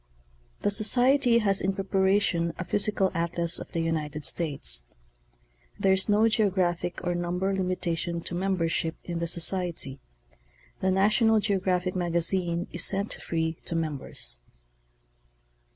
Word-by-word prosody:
The 205 - +2
Socrery 245 +4 +3
has 195 -2 +2
in 195 +1 0
preparation 190 -3 +1
a 185 - -5
physical 200 0 +1
atlas 170 0 -1
of - - -9
the 165 - -2
United 155 -2 -2
States. 95 - +3 0.9
There 190 - +3
is 190 +2 +1
no 210 +2 +4
geographic 185 -6 0
or 175 - 0
number 175 +3 -1
limitation 175 -2 -2
to 175 - -7
membership 170 -3 -1
in 170 -1 -4
the 170 - -2
Socimry. 170 -5 -2 0.8
The 190 - 0
National 215 +4 +3
Geographic 185 -3 0
Magazine 175 0 0
is - - +2
sent 200 +1 +2
free 160 -1 -2
to 170 - -3
members. 140 - -3
180 Hz, 125 wpm, -27 LUFS, 165-195 Hz, 0.9 s, no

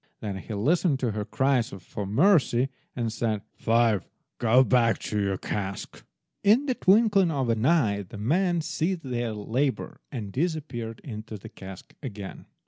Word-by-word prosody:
Then 100 -3 -4
he 105 +3 -6
listened 150 - +2
to 120 -3 +1
her 105 0 -3
cries 130 +1 +1
for 100 +1 -7
mercy, 135 - +3 0.3
and 115 -3 -2
said— 110 -3 -1
"Five, 115 -3 +2 0.4
go 120 +2 +5
back 120 -3 +3
to 105 -1 -2
your 100 -1 0
cask!" 100 0 -5 0.4
In 220 +8 +5
the 265 - +1
twinkling 200 -3 +4
of 135 -6 -1
an 115 -1 +1
eye 115 -12 +3
the 100 +3 -10
men 170 - +1
ceased 165 +3 -2
their 120 -3 -2
labour, 125 +6 -2
and 110 -7 -5
disappeared 135 - -3
into 110 -4 -7
the 95 - -11
cask 95 -1 -11
again. 105 -8 -7
120 Hz, 155 wpm, -27 LUFS, 105-155 Hz, 0.4 s, go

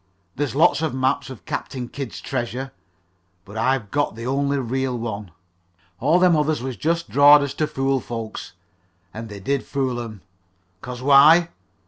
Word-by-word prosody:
There's 145 -1 -2
lots 155 +1 +4
of 160 -5 -1
maps 130 +1 0
of 130 - -11
Captain 125 -2 -5
Kidd's 135 -1 -7
treasure, 130 0 -4 0.7
but 100 - -12
I've 115 -2 0
got 145 -5 0
the 115 +1 -7
only 140 +2 0
real 130 0 -2
one. 105 -4 -5 0.7
All 150 +7 +3
them 180 -2 +4
others 150 0 +1
was 130 0 -5
jest 170 +4 -1
drawed 145 +1 +7
so - - 0
as 140 - -5
to 155 +1 -1
fool 135 -1 0
folks. 115 -2 -7 0.6
An' 115 +1 -7
they 105 -2 -9
did 135 +7 -1
fool 130 -3 -2
'em. 110 -4 -8 0.6
'Cause 125 0 -7
why? 150 +5 +6
135 Hz, 165 wpm, -22 LUFS, 120-145 Hz, 0.7 s, drawed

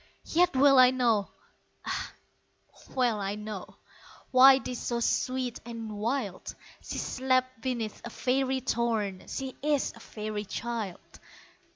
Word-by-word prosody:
Yet 355 -1 +2
well 275 0 +6
I 255 0 +9
know, 235 -6 +1 0.6
ah, - - -3 0.8
well 245 -5 +2
I 200 0 -2
know 210 -2 -7 0.6
Why 265 +1 +8
'tis 250 -2 -5
so 235 -1 -2
sweet 255 +1 -1
and 230 -1 -7
wild 210 -1 -3 0.3
She - - -6
slept 255 -2 0
beneath 235 -4 -3
a 235 - -6
faery 260 +2 0
thorn, 225 -6 -1
She 265 -1 -5
is 295 -1 +1
a - - -13
faery 210 -1 -5
child! 225 -3 -5
240 Hz, 130 wpm, -29 LUFS, 215-260 Hz, 0.8 s, I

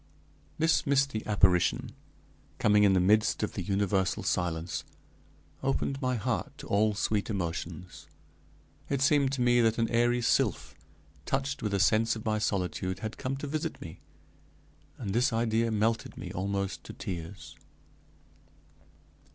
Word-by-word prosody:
This 160 -1 +2
misty 140 -5 +1
apparition, 90 -4 +2 0.7
coming 105 0 +4
in 100 -2 +5
the 95 - +4
midst 105 +4 +3
of 105 - -2
the 95 - -4
universal 95 0 0
silence, 85 -1 -1 0.8
opened 135 +1 -1
my 130 -1 0
heart 110 - -2
to - - -9
all 105 +1 +2
sweet 105 +1 -1
emotions. 85 -3 -5 0.8
It 140 - 0
seemed 145 -3 +3
to 135 - -1
me 120 0 +4
that 115 -1 +2
an 115 -1 +2
airy 120 +1 +2
sylph, 70 - +1 0.5
touched 135 0 -1
with 105 -2 -1
a - - +1
sense 110 +4 +3
of 110 - -8
my 110 -1 +1
solitude, 95 -2 -1
had 110 0 -5
come 135 0 -2
to 140 - -5
visit 155 +2 -3
me, - - -9 1.0
and 100 -6 -4
this 125 +4 +2
idea 115 0 +1
melted 110 +1 0
me - - -6
almost 100 +1 -3
to - - -8
tears. 85 +1 -7
110 Hz, 145 wpm, -29 LUFS, 95-120 Hz, 1.0 s, in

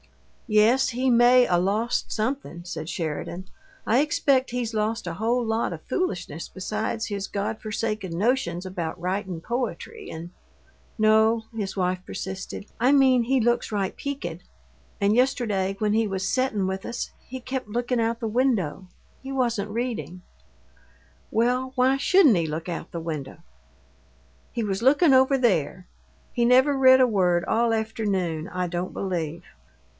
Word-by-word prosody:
"Yes, 235 +5 +4
he 255 +1 0
may 245 +1 +6
'a' 175 - +2
lost 205 +6 0
something," 220 -6 -3
said 160 -2 -6
Sheridan. 170 +3 -4 0.4
"I 235 - +4
expect 275 -3 +2
he's 240 -2 -3
lost 215 -1 -1
a 170 - -3
whole 230 +6 0
lot 225 -2 0
o' 170 - -4
foolishness 180 - -3
besides 215 +4 -3
his 200 -2 -4
God 205 +2 -3
forsaken 215 -5 -3
notions 190 -5 0
about 175 -2 -4
writin' 185 0 -3
poetry 260 - -4
and 165 +2 -8 0.4
" - - -33
"No," 220 +1 +4
his 200 -3 -4
wife 185 0 0
persisted. 190 +1 -6 0.2
"I 250 +3 +4
mean 265 -3 +5
he 260 +3 +2
looks 240 0 +1
right 200 -3 -1
peakid. 265 - -5 0.6
And 200 +2 +2
yesterday, 215 -7 +1
when 210 -1 +1
he 225 +1 +2
was 190 -1 -2
settin' 220 -5 0
with 190 0 -4
us, 240 0 -4 0.2
he 260 +1 -6
kept 255 -2 -5
lookin' 240 +2 -1
out 230 +1 0
the 230 - -2
window. 215 - 0 0.3
He 270 - -7
wasn't 235 -6 0
readin'." 225 -5 -4 1.1
"Well, 250 +3 +1
why 260 +1 +3
shouldn't 290 - +5
he 165 -2 0
look 155 +3 -4
out 170 -2 -5
the 170 - -4
window?" 155 -5 -5 1.1
"He 235 - -2
was 195 -1 -2
lookin' 285 +4 +5
over 265 +1 +5
there. 185 - 0 0.5
He 240 - +1
never 260 +4 +5
read 260 -1 +7
a 255 - +5
word 180 -5 +2
all 230 +2 +2
afternoon, 200 -7 -1
I 180 -2 -2
don't 175 +1 -4
believe." 170 -3 -3
220 Hz, 155 wpm, -25 LUFS, 185-250 Hz, 1.1 s, read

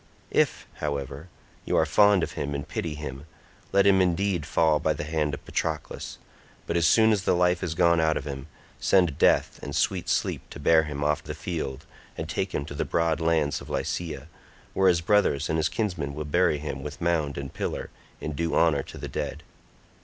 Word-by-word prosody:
If, - - +1
however, 70 +2 -4 0.3
you - - 0
are 80 - +4
fond 100 +3 +5
of - - -2
him 70 0 -3
and 70 - -5
pity 80 -3 -3
him, 75 0 -7 0.4
let 100 0 +4
him 95 -1 +5
indeed 90 -2 +1
fall 80 -2 +3
by 80 0 +1
the 75 - -5
hand 75 -1 -1
of - - -15
Patroclus, 80 -2 -3 0.5
but 85 - -2
as 85 -1 +4
soon 110 +4 +5
as 105 -3 +2
the 95 - +2
life 90 0 +2
is 85 -4 -2
gone 85 -1 +4
out 80 -1 +2
of - - -5
him, 70 -1 -6 0.3
send 90 -7 +3
Death - - +3
and 70 - -5
sweet 95 0 0
Sleep - - 0
to - - -9
bear 80 +2 +4
him 75 -1 -4
off 75 0 +1
the - - -6
field 75 -4 -4 0.3
and - - -4
take - - -2
him 70 - -1
to 70 - -8
the - - -1
broad 85 -1 0
lands 80 -3 +1
of - - -11
Lycia, 80 -4 -3 0.5
where 95 -1 +4
his 85 -2 +2
brothers 85 -6 +2
and 80 - +1
his 80 - +1
kinsmen 85 -10 -2
will 75 0 -4
bury 80 0 +2
him 70 -2 -5
with 75 +4 -7
mound 80 -5 0
and 70 -1 -6
pillar, - - -4 0.3
in 75 - -4
due 80 +3 -1
honour 80 -4 +3
to - - -11
the - - -6
dead." - - -4
80 Hz, 205 wpm, -26 LUFS, 75-85 Hz, 0.5 s, fond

